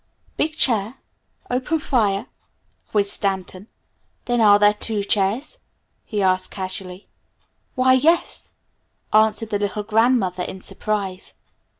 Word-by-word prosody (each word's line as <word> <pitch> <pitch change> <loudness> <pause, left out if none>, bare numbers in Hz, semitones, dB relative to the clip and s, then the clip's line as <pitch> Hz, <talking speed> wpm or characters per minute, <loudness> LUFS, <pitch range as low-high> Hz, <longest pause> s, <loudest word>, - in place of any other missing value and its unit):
"Big 310 +1 -1
chair 225 -3 +2 0.6
open 255 +6 0
fire?" 220 -8 0 0.6
quizzed 200 -2 +2
Stanton. 190 0 -1 0.6
"Then, 240 -1 +1
are 205 -2 +7
there 205 0 +4
two 210 0 -3
chairs?" 215 - 0 0.5
he 205 -2 -2
asked 185 0 +1
casually. 185 0 -5 0.7
"Why, 255 0 +4
yes," 320 +7 +1 0.6
answered 220 +1 +2
the 205 - 0
little 205 +1 -2
grandmother 220 -4 +1
in 190 - -5
surprise. 200 -3 -4
210 Hz, 110 wpm, -21 LUFS, 195-240 Hz, 0.7 s, are